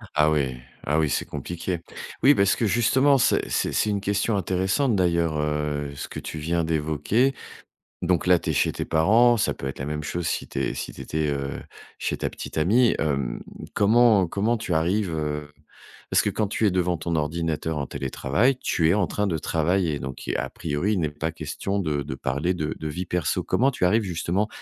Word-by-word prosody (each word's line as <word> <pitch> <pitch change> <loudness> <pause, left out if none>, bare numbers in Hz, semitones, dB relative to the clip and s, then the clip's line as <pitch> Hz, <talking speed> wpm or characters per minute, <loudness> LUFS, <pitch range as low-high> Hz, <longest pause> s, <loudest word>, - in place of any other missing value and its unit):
Ah 75 +1 +4
oui, 70 -4 0 0.3
ah 75 +2 +2
oui, 75 - +2
c'est - - -1
compliqué. 85 +4 -4 0.4
Oui 140 - +8
parce 100 -6 +3
que 115 - 0
justement 130 +7 +4
c'est 120 - +2
c'est - - 0
c'est 110 - +1
une 100 -1 -1
question 100 +2 0
intéressante 95 - +1
d'ailleurs, 85 -4 +1
heu, 75 -1 -2
ce 70 - -6
que - - -7
tu 80 - -7
viens 85 +2 0
d'évoquer. 80 - +1 0.7
Donc 90 0 +1
là, 90 -1 +6
tu - - -2
es - - -2
chez - - +2
tes - - -4
parents. 115 +9 +4
Ça - - 0
peut - - -7
être 70 - -6
la 70 - -3
même 75 0 -3
chose 85 +3 -3
si - - -2
tu - - -4
es - - -1
si - - -5
tu - - -9
étais, 80 0 -1
heu, 70 -1 -3 0.4
chez - - -2
ta - - -2
petite - - -8
amie. 115 +9 +4
Hem 70 -6 -1 0.3
comment 110 -2 +4
comment 105 +7 0
tu 105 -6 -3
arrives, 90 +3 +1
heu 75 -1 -3 0.6
parce - - +5
que - - +1
quand 110 - -1
tu 110 +2 0
es 100 - +4
devant 90 -1 +1
ton 85 +1 -2
ordinateur 80 0 -1
en 70 - -2
télétravail, 115 - 0
tu 80 -2 +1
es 85 - +5
en 100 -4 +1
train 105 0 -1
de 85 -4 0
travailler. 80 -1 0
Donc 65 +1 -7
à - - -2
priori 90 +9 -1
il 95 - 0
n'est 75 - 0
pas 80 +2 -3
question 85 +5 -3
de 75 -5 -1
de 70 -1 -5
parler 70 +7 -1
de 80 -3 -2
de 80 - -4
vie 90 +4 -4
perso. 90 -3 -1
Comment 135 +3 +2
tu 125 - -4
arrives 110 +5 +3
justement 90 +2 -1
85 Hz, 210 wpm, -25 LUFS, 75-100 Hz, 0.7 s, Oui